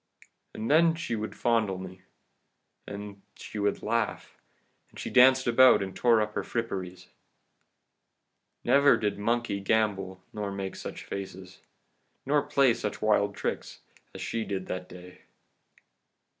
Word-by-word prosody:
And 110 Hz, +5 st, -3 dB
then 165 Hz, +1 st, +5 dB
she 160 Hz, -8 st, -3 dB
would 110 Hz, 0 st, -5 dB
fondle 110 Hz, -5 st, +1 dB
me, 95 Hz, 0 st, -9 dB, 0.9 s
and 100 Hz, 0 st, -7 dB
then -, -, -28 dB
she 105 Hz, -, -8 dB
would 100 Hz, 0 st, -1 dB
laugh, -, -, -2 dB, 0.5 s
and -, -, -17 dB
she -, -, -5 dB
danced 130 Hz, +1 st, +6 dB
about 125 Hz, -2 st, +6 dB
and 95 Hz, -1 st, -7 dB
tore 115 Hz, -3 st, +4 dB
up 105 Hz, 0 st, -2 dB
her -, -, -1 dB
fripperies. 95 Hz, -6 st, -5 dB, 1.5 s
Never 140 Hz, +1 st, +5 dB
did 105 Hz, -1 st, -2 dB
monkey 115 Hz, -1 st, 0 dB
gambol 95 Hz, -3 st, 0 dB
nor 105 Hz, -2 st, -4 dB
make 95 Hz, -1 st, -5 dB
such -, -, -7 dB
faces, 95 Hz, -1 st, -8 dB, 0.7 s
nor 145 Hz, +2 st, +3 dB
play 140 Hz, -3 st, +3 dB
such 110 Hz, -3 st, -4 dB
wild 100 Hz, -1 st, +2 dB
tricks, -, -, -4 dB, 0.3 s
as -, -, -7 dB
she 115 Hz, -1 st, -2 dB
did 95 Hz, -2 st, -4 dB
that 90 Hz, 0 st, -5 dB
day. 90 Hz, 0 st, -13 dB
105 Hz, 140 wpm, -28 LUFS, 95-120 Hz, 1.5 s, danced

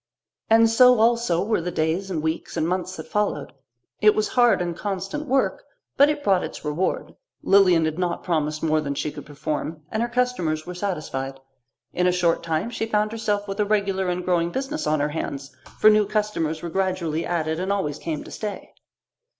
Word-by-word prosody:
And 225 Hz, +1 st, +6 dB
so 250 Hz, +1 st, +6 dB
also 230 Hz, -6 st, +2 dB
were 220 Hz, -4 st, +1 dB
the 175 Hz, -, -3 dB
days 170 Hz, +4 st, -1 dB
and 160 Hz, -5 st, -2 dB
weeks 160 Hz, +1 st, -3 dB
and 160 Hz, -, +1 dB
months 185 Hz, +1 st, -2 dB
that -, -, -7 dB
followed. 210 Hz, 0 st, -1 dB, 0.5 s
It 425 Hz, 0 st, +6 dB
was 430 Hz, -1 st, 0 dB
hard 245 Hz, -7 st, +4 dB
and 175 Hz, -1 st, -2 dB
constant 200 Hz, -, -4 dB
work, 270 Hz, -, +1 dB, 0.3 s
but 285 Hz, +1 st, +6 dB
it 300 Hz, -1 st, -2 dB
brought 190 Hz, -7 st, +3 dB
its -, -, -7 dB
reward. 150 Hz, +5 st, -2 dB, 0.3 s
Lilian 185 Hz, -5 st, +5 dB
had 155 Hz, +2 st, -2 dB
not 175 Hz, -1 st, -1 dB
promised 155 Hz, -3 st, -1 dB
more 155 Hz, -1 st, +2 dB
than 140 Hz, -2 st, -3 dB
she 150 Hz, -, -2 dB
could 145 Hz, -2 st, -10 dB
perform, 150 Hz, +1 st, -4 dB
and 220 Hz, -, -1 dB
her 240 Hz, -, 0 dB
customers 240 Hz, -11 st, -1 dB
were 180 Hz, -, -6 dB
satisfied. 155 Hz, -8 st, -4 dB, 0.5 s
In 180 Hz, 0 st, +2 dB
a -, -, +4 dB
short 175 Hz, -2 st, +1 dB
time 165 Hz, +7 st, -2 dB
she 225 Hz, -, -3 dB
found 215 Hz, -1 st, +1 dB
herself 210 Hz, -2 st, -1 dB
with 195 Hz, +1 st, -5 dB
a 210 Hz, -, +3 dB
regular 195 Hz, -3 st, 0 dB
and 180 Hz, 0 st, -2 dB
growing 170 Hz, -2 st, +1 dB
business 270 Hz, -, -3 dB
on 155 Hz, -1 st, +1 dB
her 145 Hz, -, 0 dB
hands, 140 Hz, -3 st, -5 dB, 0.2 s
for 215 Hz, -, +7 dB
new 210 Hz, -1 st, +3 dB
customers 210 Hz, -7 st, -1 dB
were 170 Hz, -, -4 dB
gradually 180 Hz, -4 st, -1 dB
added 160 Hz, -2 st, -1 dB
and 190 Hz, +2 st, -1 dB
always 150 Hz, -8 st, -1 dB
came 155 Hz, -3 st, -4 dB
to -, -, -12 dB
stay. 210 Hz, -2 st, -6 dB
180 Hz, 200 wpm, -24 LUFS, 160-215 Hz, 0.5 s, for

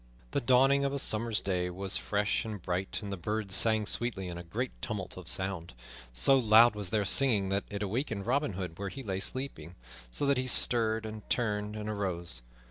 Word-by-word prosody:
The -, -, 0 dB
dawning 135 Hz, +3 st, +4 dB
of 140 Hz, 0 st, 0 dB
a -, -, -1 dB
summer's 115 Hz, -4 st, +1 dB
day 90 Hz, -2 st, -1 dB
was 95 Hz, +2 st, +2 dB
fresh 105 Hz, +1 st, 0 dB
and 110 Hz, -2 st, -6 dB
bright, 90 Hz, +2 st, -3 dB
and 100 Hz, -, -5 dB
the -, -, -4 dB
birds 105 Hz, +2 st, -3 dB
sang 110 Hz, +1 st, +4 dB
sweetly 100 Hz, -4 st, +1 dB
in 85 Hz, -, -6 dB
a -, -, -8 dB
great 115 Hz, +9 st, -3 dB
tumult 105 Hz, -5 st, -5 dB
of 90 Hz, -2 st, -10 dB
sound. 90 Hz, -7 st, -3 dB, 0.4 s
So -, -, +4 dB
loud 115 Hz, 0 st, +6 dB
was 105 Hz, -3 st, -3 dB
their 105 Hz, +1 st, 0 dB
singing 105 Hz, -4 st, +3 dB
that 100 Hz, +1 st, -1 dB
it 100 Hz, 0 st, -4 dB
awakened 105 Hz, -1 st, -3 dB
Robin 135 Hz, -1 st, 0 dB
Hood 90 Hz, -2 st, -6 dB
where 100 Hz, -1 st, -3 dB
he 135 Hz, +8 st, -8 dB
lay 95 Hz, -4 st, -3 dB
sleeping, 95 Hz, -, -4 dB, 0.3 s
so 100 Hz, -, -1 dB
that 140 Hz, -1 st, +3 dB
he 130 Hz, -, -2 dB
stirred, 110 Hz, -3 st, +3 dB
and 110 Hz, -1 st, -8 dB
turned, 105 Hz, -3 st, -1 dB
and 105 Hz, 0 st, -5 dB
arose. 90 Hz, -, -3 dB
105 Hz, 205 wpm, -30 LUFS, 95-120 Hz, 0.4 s, loud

